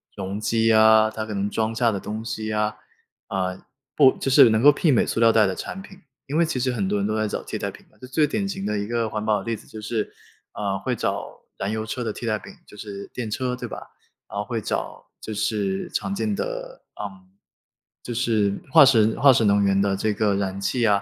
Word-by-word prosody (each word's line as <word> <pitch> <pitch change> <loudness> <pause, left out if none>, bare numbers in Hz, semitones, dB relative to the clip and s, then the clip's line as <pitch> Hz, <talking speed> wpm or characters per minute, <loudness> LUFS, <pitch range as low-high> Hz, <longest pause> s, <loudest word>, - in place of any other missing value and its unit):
容 100 0 -4
积 115 +1 +2
啊， 110 0 +6
它 110 0 -4
可 110 - -6
能 100 0 -1
装 110 +1 -1
下 115 -1 +2
的 100 - -3
东 110 +3 -5
西 110 -2 -4
啊， 105 0 0 0.5
啊， 95 -1 -3 0.3
不 135 -3 +7
就 135 - -3
是 120 - +8
能 110 +1 +2
够 145 - +8
媲 145 0 +2
美 - - +3
塑 - - -2
料 115 0 +6
袋 110 -1 +4
的 95 - 0
产 195 - -6
品。 195 -1 -14 0.3
因 145 +3 -3
为 170 - +4
其 160 -4 -3
实 130 +1 0
很 105 -6 -1
多 105 +1 0
人 100 - 0
都 110 +1 -1
在 110 - 0
找 - - -4
替 - - -5
代 - - -2
品 - - -13
嘛， - - -27
这 130 - -10
最 150 +4 +2
典 200 +4 -2
型 195 0 -4
的 105 -1 -1
一 100 - -3
个 115 -2 -1
环 105 0 -3
保 105 -2 +2
的 95 - -8
例 115 -1 -2
子 - - -17
就 110 - -9
是， 110 0 -2 0.4
啊， 100 -2 -2
会 125 +2 -2
找 - - -4 0.2
燃 100 - -2
油 110 0 -2
车 125 - -4
的 110 -3 -2
替 120 - -7
代 110 -2 0
品， 200 - -12
就 105 - -15
是 100 -1 -7
电 115 -3 -4
车 125 +3 -2
对 - - -5
吧？ - - -7 0.5
然 100 - -5
后 105 - -2
会 115 -2 -3
找 - - -4
就 110 - -6
是 100 -2 -1
常 195 0 -2
见 215 +1 -1
的， - - -5 0.2
嗯， 95 -3 -8 0.8
就 120 - -5
是 110 -4 +1 0.2
化 155 +2 +8
石 110 -4 +4
化 140 -1 +7
石 115 -3 +3
能 100 0 +4
源 100 0 +3
的 100 -1 +1
这 105 +2 0
个 105 -1 +1
燃 100 -1 -2
气 120 +4 0
啊， 100 -2 +3
110 Hz, 270 characters per minute, -23 LUFS, 105-125 Hz, 0.8 s, 是